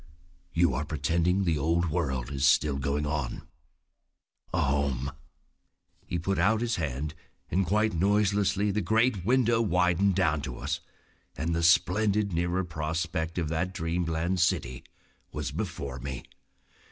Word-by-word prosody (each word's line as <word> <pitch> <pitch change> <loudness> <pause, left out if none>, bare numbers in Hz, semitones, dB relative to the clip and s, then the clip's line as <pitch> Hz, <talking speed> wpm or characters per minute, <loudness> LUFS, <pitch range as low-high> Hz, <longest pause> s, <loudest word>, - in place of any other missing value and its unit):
"You 85 -4 +3
are 70 +5 -1
pretending 85 +6 +1
the 80 -5 +1
old 85 +3 +1
world 70 -7 -1
is 70 -1 +2
still 75 -1 +3
going 70 +2 -1
on. 75 -4 -3 1.0
A 90 - 0
home!" 70 -2 0 1.0
He 85 - -2
put 95 +3 -1
out 110 +5 +3
his 120 -1 0
hand, 75 -2 -3 0.4
and 95 +1 +1
quite 105 +3 +2
noiselessly 100 +2 +2
the 105 +2 0
great 110 +1 +2
window 120 +1 +3
widened 90 -1 +2
down 80 -6 +2
to 65 -3 -6
us, - - -2 0.6
and 85 +2 -1
the 85 - 0
splendid 100 +4 +3
nearer 85 +2 0
prospect 80 0 -3
of 85 -3 0
that 90 +3 -2
dreamland 85 +1 -1
city 65 -7 0 0.5
was - - -3
before 70 -2 -4
me. 65 0 -5
85 Hz, 140 wpm, -28 LUFS, 75-95 Hz, 1.0 s, You